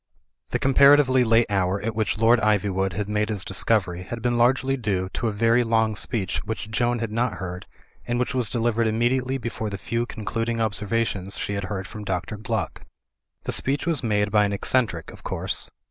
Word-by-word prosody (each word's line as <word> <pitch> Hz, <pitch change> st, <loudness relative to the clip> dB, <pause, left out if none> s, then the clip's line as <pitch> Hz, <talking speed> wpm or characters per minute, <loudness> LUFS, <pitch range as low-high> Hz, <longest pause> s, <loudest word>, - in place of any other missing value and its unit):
The -, -, 0 dB
comparatively 135 Hz, -1 st, +5 dB
late 115 Hz, 0 st, +4 dB
hour 95 Hz, 0 st, +1 dB
at 115 Hz, +2 st, -3 dB
which 110 Hz, -2 st, 0 dB
Lord 115 Hz, +2 st, +4 dB
Iv)rwood 100 Hz, -3 st, +1 dB
had 100 Hz, +2 st, -3 dB
made 105 Hz, +1 st, 0 dB
his 100 Hz, -3 st, -2 dB
discovery 95 Hz, -2 st, +1 dB
had 115 Hz, +5 st, -6 dB
been 120 Hz, +1 st, 0 dB
largely 130 Hz, +3 st, +2 dB
due 100 Hz, -7 st, -2 dB
to 115 Hz, -, -2 dB
a -, -, 0 dB
very 115 Hz, +3 st, +3 dB
long 110 Hz, -1 st, +1 dB
speech 100 Hz, -3 st, -1 dB
which 110 Hz, 0 st, -5 dB
Joan 120 Hz, +2 st, +1 dB
had 115 Hz, -2 st, -3 dB
not 120 Hz, +1 st, 0 dB
heard, 90 Hz, -1 st, -7 dB, 0.4 s
and 120 Hz, -, 0 dB
which 125 Hz, +2 st, -1 dB
was 125 Hz, -4 st, +1 dB
delivered 115 Hz, -1 st, +1 dB
immediately 125 Hz, +4 st, 0 dB
before 115 Hz, -3 st, -4 dB
the 100 Hz, -, -5 dB
few 115 Hz, +4 st, -2 dB
concluding 115 Hz, +1 st, -3 dB
ob 110 Hz, -2 st, 0 dB
servations 100 Hz, -1 st, -1 dB
she 100 Hz, -, -2 dB
had 100 Hz, -1 st, -3 dB
heard 95 Hz, -1 st, -4 dB
from 105 Hz, -, -8 dB
Dr. 95 Hz, +2 st, -3 dB
Gluck. 110 Hz, -2 st, -3 dB, 0.6 s
The -, -, -3 dB
speech 140 Hz, +4 st, 0 dB
was 165 Hz, -5 st, 0 dB
made 105 Hz, -3 st, 0 dB
by 105 Hz, 0 st, +4 dB
an 100 Hz, -, -2 dB
eccentric, 100 Hz, -5 st, 0 dB
of -, -, -14 dB
course. -, -, -2 dB
110 Hz, 195 wpm, -24 LUFS, 100-120 Hz, 0.6 s, comparatively